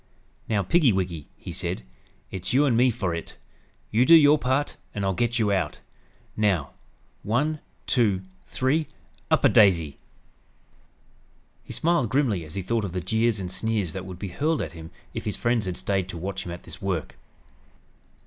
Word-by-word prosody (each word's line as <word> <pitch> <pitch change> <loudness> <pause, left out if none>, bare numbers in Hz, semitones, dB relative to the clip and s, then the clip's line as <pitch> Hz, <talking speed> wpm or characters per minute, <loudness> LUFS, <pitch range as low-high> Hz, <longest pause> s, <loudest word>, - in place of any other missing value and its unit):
"Now, 105 -3 +2
piggy 145 - +4
wig," 90 -6 -2
he - - -8
said. - - -3 0.5
"It's 95 +4 -3
you 140 +3 +5
and 130 -5 +3
me 125 +2 +5
for 100 -7 -1
it. 85 - -6 0.5
You 115 +3 +4
do 165 +5 +8
your 150 -1 +7
part 130 +2 0 0.2
and 100 -1 -1
I'll 95 - +1
get 120 +5 0
you 110 -3 +2
out. 90 -6 -1 0.6
Now 95 -9 +1 0.5
'one 145 +8 0 0.3
two 105 -7 +2 0.2
three 145 +4 0 0.4
up - - +3
a - - +10
daisy!'" 85 -8 +4 1.6
He - - -10
smiled 160 -8 +1
grimly 115 - +1
as 75 +3 -9
he 95 - -2
thought 115 +3 0
of 95 -4 -4
the 90 - -1
jeers 110 +2 +1
and 90 -2 -4
sneers 105 -5 -1
that 95 0 -6
would 90 -2 -7
be 100 +1 -5
hurled 150 - 0
at - - -6
him 80 -1 -9 0.2
if - - -5
his 105 - -2
friends 120 -4 +1
had 90 - -3
stayed 95 -2 -1
to 90 - -5
watch 95 +2 -4
him - - -4
at 85 - -8
this - - -10
work. 95 -5 -2
105 Hz, 180 wpm, -25 LUFS, 90-125 Hz, 1.6 s, a